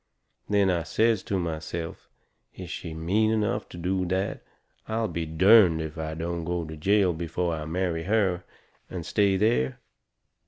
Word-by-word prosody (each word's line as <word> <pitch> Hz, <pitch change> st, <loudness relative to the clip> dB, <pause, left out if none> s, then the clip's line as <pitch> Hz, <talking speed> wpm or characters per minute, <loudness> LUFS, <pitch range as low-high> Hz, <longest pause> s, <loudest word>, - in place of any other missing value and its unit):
Then 100 Hz, -2 st, +3 dB
I 85 Hz, -2 st, +1 dB
says 110 Hz, +4 st, +2 dB
to 100 Hz, -, -1 dB
myself 80 Hz, -1 st, -4 dB, 0.5 s
is 90 Hz, -2 st, -8 dB
she 85 Hz, -, -5 dB
is 80 Hz, -, -7 dB
mean 100 Hz, +7 st, +2 dB
enough 110 Hz, -2 st, 0 dB
to -, -, -10 dB
do 90 Hz, +2 st, -1 dB
that 95 Hz, +2 st, -1 dB, 0.5 s
I'll 110 Hz, 0 st, 0 dB
be 85 Hz, -3 st, -3 dB
derned 90 Hz, +1 st, +6 dB
if 80 Hz, 0 st, -5 dB
I 80 Hz, 0 st, -3 dB
don't 85 Hz, +1 st, -3 dB
go 85 Hz, 0 st, -2 dB
to 80 Hz, 0 st, -7 dB
jail 95 Hz, +3 st, +3 dB
before 85 Hz, +1 st, -2 dB
I 80 Hz, -1 st, -4 dB
marry 85 Hz, 0 st, -2 dB
her, 95 Hz, -4 st, +1 dB, 0.5 s
and 90 Hz, -3 st, -6 dB
stay 100 Hz, +1 st, +2 dB
there. 95 Hz, -, +1 dB
90 Hz, 165 wpm, -27 LUFS, 80-100 Hz, 0.5 s, derned